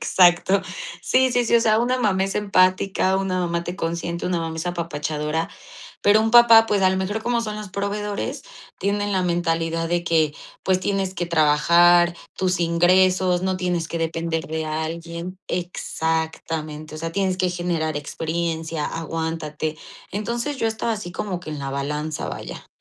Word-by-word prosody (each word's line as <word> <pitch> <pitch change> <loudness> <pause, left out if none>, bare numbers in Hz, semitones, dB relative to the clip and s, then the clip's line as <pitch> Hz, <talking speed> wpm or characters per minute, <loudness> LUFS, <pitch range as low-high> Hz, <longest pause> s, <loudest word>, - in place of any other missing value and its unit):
Exacto. 185 +2 +4 0.4
Sí, 260 0 +3
sí, 245 0 +2
sí, 235 - +1
o 230 - +4
sea, 220 -1 +3
una 250 +2 +1
mamá 195 -5 +2
es 195 - -3
empática, 190 -1 +2
una 190 -1 -1
mamá 170 -1 -1
te 175 - -4
consiente, 170 -1 -3
una 180 -1 0
mamá 165 -1 -4
es 160 +2 -4
apapachadora, 160 -2 -2 0.5
pero 205 +1 +5
un 225 - 0
papá, 230 -1 +8
pues, 205 -3 +1
a 190 - +5
lo 190 - 0
mejor 205 +4 -2
como 240 0 0
son 215 -2 -4
los 210 -2 -7
proveedores, 200 +1 -3 0.4
tienen 205 +1 0
la 190 -1 +1
mentalidad 165 -1 0
de 175 0 0
que: 160 -3 +2 0.3
"Pues, 185 -1 +2
tienes 195 -1 -1
que 175 -1 -2
trabajar, 170 +2 +5 0.2
tus 185 -1 0
ingresos 180 +2 +3
no 190 0 0
tienes 180 -2 -1
que 170 - -4
depender 165 0 -2
de 160 0 -3
alguien". 170 +3 -4
Exactamente, 160 -3 -3
o - - -7
sea: 165 +1 -4
"Tienes 190 0 0
que 185 -1 +1
generar 170 -3 -2
experiencia, 160 +1 -3
aguántate." 160 -1 -3 0.3
Entonces, 235 +7 -3
yo 230 - -1
estaba 225 +1 -1
así 205 -5 -6
como 185 -2 -4
que 165 -3 -8
en 150 - -5
la 135 - -4
balanza, 150 +3 -3
vaya. - - -7
175 Hz, 170 wpm, -23 LUFS, 165-195 Hz, 0.5 s, papá